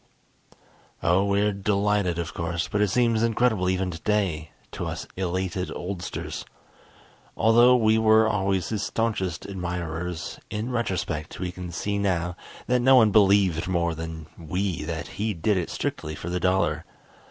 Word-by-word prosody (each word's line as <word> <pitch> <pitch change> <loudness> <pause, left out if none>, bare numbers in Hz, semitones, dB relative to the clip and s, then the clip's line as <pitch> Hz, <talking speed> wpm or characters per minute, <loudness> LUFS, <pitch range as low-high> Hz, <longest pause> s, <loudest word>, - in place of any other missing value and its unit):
Oh, 90 +4 +3
we're 100 +1 +2
delighted 100 -2 +1
of 85 -4 -4
course, 85 -1 -2
but 105 - -1
it 105 - +4
seems 115 +1 +2
incredible 115 -5 +2
even 95 0 0
today 85 -3 -1 0.2
to - - -4
us - - -5
elated 95 +1 -2
oldsters. 90 0 -5 0.9
Although 120 +3 +6
we 110 -2 +3
were 110 0 +5
always 95 -3 0
his 110 -3 -2
staunchest 100 -6 -2
admirers, 90 -2 -4
in 110 +4 -3
retrospect 90 -9 -2
we 90 -1 -3
can 90 -1 -7
see 100 +4 -2
now 90 -3 0 0.3
that 125 +1 +2
no 130 +2 +6
one 110 -4 +6
believed 95 -5 +4
more 85 -2 0
than 80 0 -6
we 90 +3 -2
that 80 0 -4 0.2
he 110 -1 0
did 100 +5 +1
it 90 -3 -1
strictly 75 0 -3
for 85 - -6
the 90 - -1
dollar. 85 -4 +1
95 Hz, 150 wpm, -25 LUFS, 85-105 Hz, 0.9 s, Although